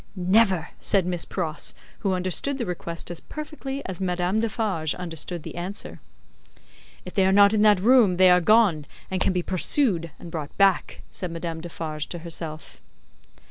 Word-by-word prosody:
"Never!" 185 -2 +2
said 195 -3 +1
Miss 175 -2 -1
Pross, 165 -4 -4 0.2
who 195 -3 0
understood 185 - -1
the 240 - -2
request 170 -2 -5
as 170 - -4
perfectly 295 -3 -7
as 190 -1 -6
Madame 180 +2 0
Defarge 215 -8 -1
understood 170 -1 -5
the - - -8
answer. 180 +4 -7 1.1
"If 180 - -8
they 195 - +3
are 190 - +3
not 200 +1 +6
in 215 - +2
that 210 -3 +5
room, 225 -3 +5
they 185 0 +6
are 180 0 +5
gone, 195 -7 +3 0.2
and 185 -1 -2
can - - +3
be 180 -1 -1
pursued 185 - +2
and 170 - -11
brought 155 -4 -6
back," 195 -2 +2
said 180 - -5
Madame 165 -1 -5
Defarge 160 -2 -5
to 175 - -6
herself. 160 -2 -7
180 Hz, 170 wpm, -24 LUFS, 170-205 Hz, 1.1 s, not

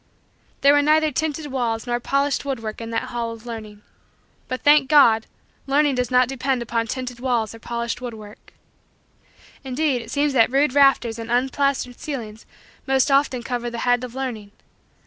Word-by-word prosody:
There 280 +1 +6
were 290 - +4
neither 310 +1 +3
tinted 315 +2 -2
walls 240 -5 -2
nor 240 -1 -1
polished 275 +3 0
woodwork 230 -6 -5
in 230 - -6
that 230 - -3
hall 235 -2 -3
of 230 0 -11
learning. 215 -3 -8 0.6
But, 255 - -5
thank 290 -2 +5
God, 230 -7 +5 0.4
learning 285 +1 +3
does 250 -1 -1
not 250 -1 +4
depend 265 -1 -1
upon 230 -1 -2
tinted 250 0 -5
walls 240 -4 -1
or 225 - -11
polished 235 +1 -4
woodwork. 220 -4 -10 1.1
Indeed 265 -1 -1
it - - -11
seems 290 0 0
that 230 -3 +4
rude 275 +1 +2
rafters 270 -5 +3
and 230 0 -7
unplastered 260 0 0
ceilings 225 -7 -7 0.4
most 270 +1 +2
often 275 -3 +2
covers 240 -1 -4
the - - -4
head 245 0 +2
of 250 -1 -7
learning. 225 -6 -5
250 Hz, 165 wpm, -22 LUFS, 230-275 Hz, 1.1 s, There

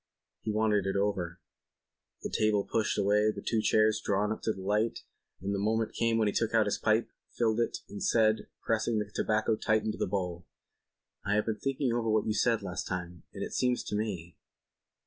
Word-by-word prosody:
He 110 - -3
wanted 105 -2 +2
it 95 - -1
over, 95 -3 -1 0.8
the - - -2
table 105 -2 +2
pushed 110 -2 0
away, 105 +2 +3
their - - -4
two 110 -2 +1
chairs 110 0 +3
drawn 105 +1 +1
up 110 - -3
to 110 - 0
the 95 - -7
light, 105 +3 0 0.4
and 100 +2 -2
the 100 - -1
moment 110 +2 0
came 115 -1 +1
when 110 -1 +2
he 100 - 0
took 115 0 0
out 110 -1 +5
his 105 - -1
pipe, 110 +1 +2 0.2
filled 115 -1 0
it, 115 - -1
and 100 - -8
said, 110 -1 +2 0.2
pressing 115 0 +1
the 105 -1 -2
tobacco 110 +1 +1
tight 110 0 +1
into 110 - -2
the - - 0
bowl: 90 -4 -3 0.8
"I 100 - +1
have 105 - +2
been 110 -2 -2
thinking 135 -2 0
over 115 -1 0
what 110 -1 +2
you 110 - 0
said 115 0 +2
last 90 -2 -4
time 90 -2 -5
and - - -5
it - - -5
seems 125 -1 +1
to - - -4
me 95 -6 -3
110 Hz, 205 wpm, -30 LUFS, 100-110 Hz, 0.8 s, out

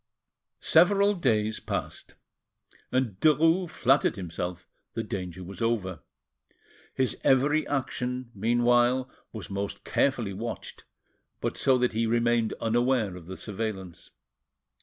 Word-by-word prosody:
Several 200 +5 +5
days 110 - 0
passed, - - -5 0.8
and 125 -7 0
Derues 165 +3 +3
flattered 130 -5 +2
him 90 -4 -6
self 90 +1 -5 0.3
the 115 - -1
danger 90 -3 -5
was 95 +5 -9
over: 100 -7 -1 1.0
his 130 -1 0
every 145 +4 +3
action 125 -3 -3
mean 115 +4 +1
while 125 +2 +3 0.2
was 110 -2 -8
most 100 +1 -4
carefully 120 -8 0
watched, 115 +4 -6 0.5
but - - -2
so 130 -1 +3
that 125 -2 +1
he 115 +1 0
remained 120 -1 +2
unaware 120 -3 +1
of 85 -2 -11
the 95 - -7
surveillance. 100 -4 -5
115 Hz, 120 wpm, -27 LUFS, 100-130 Hz, 1.0 s, Several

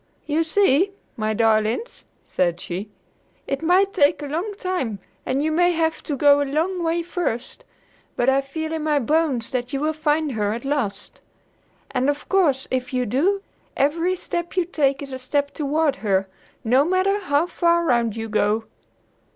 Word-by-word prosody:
"You 315 +2 +1
see, 380 +1 +3 0.2
my 215 -1 -1
darlings," 225 - +1 0.2
said 175 -1 0
she, 185 +4 -5 0.6
"it 275 +1 -3
may 360 +4 +4
take 325 -6 +2
a - - -4
long 350 +8 -3
time 360 - -2 0.3
and 270 +2 0
you 315 - +1
may 350 +2 +3
have 320 -1 0
to 290 - -2
go 285 +1 +5
a - - +3
long 325 +6 -1
way 335 +1 0
first, 330 -9 -4 0.5
but 245 - 0
I 270 +1 +4
feel 315 +4 -5
in 320 - -2
my 300 -1 +1
bones 280 -3 +1
that 250 +1 -3
you 275 - 0
will 310 +2 0
find 305 -1 0
her 210 -3 -1
at 235 +3 -6
last. 235 -9 -3 0.7
And 260 +1 +1
of 290 0 -2
course, 310 -9 +2
if 255 0 -2
you 250 -1 +1
do, 365 - +1 0.3
every 330 +6 +1
step 345 0 -4
you 365 - +3
take 285 -5 0
is 275 -1 -8
a 260 - -5
step 285 +2 -1
toward 295 -1 0
her, 195 -4 0 0.4
no 255 +4 +4
matter 370 +4 +1
how 300 -4 +1
far 340 -1 +1
round 235 -6 +1
you 225 0 -4
go." 215 +1 +1
290 Hz, 175 wpm, -22 LUFS, 250-335 Hz, 0.7 s, go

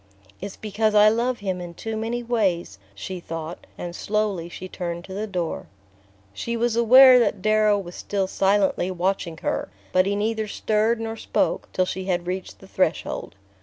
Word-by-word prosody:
"It's 200 0 -6
because 215 0 0
I 210 0 +8
love 235 +1 0
him 190 -3 -2
in 175 -1 -8
too 225 +4 -5
many 230 +2 -2
ways," 190 - 0 0.2
she 180 - -6
thought; 165 0 -7
and 175 0 -6
slowly 205 -5 -1
she 185 - -8
turned 175 -1 -5
to 190 - -9
the 210 +3 -3
door. 180 -5 -3 0.7
She 235 - -3
was 235 0 +1
aware 250 +2 +8
that 205 -5 0
Darrow 215 -1 +4
was 180 -3 -6
still 195 +1 -2
silently 195 -1 +1
watching 180 -2 -1
her, - - -1 0.2
but 185 +1 +3
he 200 - 0
neither 220 +1 -1
stirred 220 +2 +1
nor 225 0 -4
spoke - - -1
till 185 - +1
she 185 +1 -4
had 175 -2 -1
reached 185 +1 -4
the - - -13
threshold. - - -1
200 Hz, 175 wpm, -24 LUFS, 180-220 Hz, 0.7 s, I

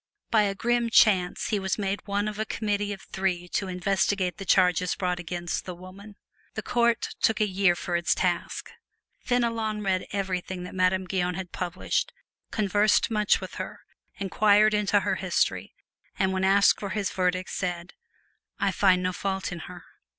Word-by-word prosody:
By 220 - +5
a 200 -1 0
grim 240 +2 +1
chance 190 -6 +3
he 210 - +1
was 190 0 -1
made 200 0 -3
one 205 +1 0
of 210 0 -5
a 220 - 0
committee 205 -2 -2
of 195 -1 -6
three 180 -2 -2
to 195 - -1
investigate 185 0 0
the 195 - -7
charges 180 -1 +3
brought 180 -2 -1
against 175 -1 -4
the 180 - -6
woman. 190 +4 -12 0.4
The - - -4
court 235 -1 +1
took 225 - +2
a 215 - +3
year 190 -2 +2
for 175 +1 -3
its 170 0 +2
task. 180 -2 -2 0.5
Fenelon 230 -3 -1
read 185 -2 0
everything 185 -2 -3
that 180 - -8
Madame 185 0 +1
Guyon 180 -1 -1
had 185 -2 -6
published, 180 0 -2 0.4
conversed 210 +1 +2
much 210 -1 +2
with - - -8
her, - - -8 0.3
inquired 210 +2 +3
into 210 -1 +2
her - - -1
history - - -1 0.4
and 190 -1 +1
when 190 0 -1
asked 195 +1 +5
for 200 - -4
his 200 0 -2
verdict 185 0 -1
said, 180 -2 -4 0.7
"I 200 - +2
find 185 -1 +3
no 185 0 0
fault 190 0 -3
in 175 - -5
her." 180 -1 -10
190 Hz, 170 wpm, -26 LUFS, 180-205 Hz, 0.7 s, By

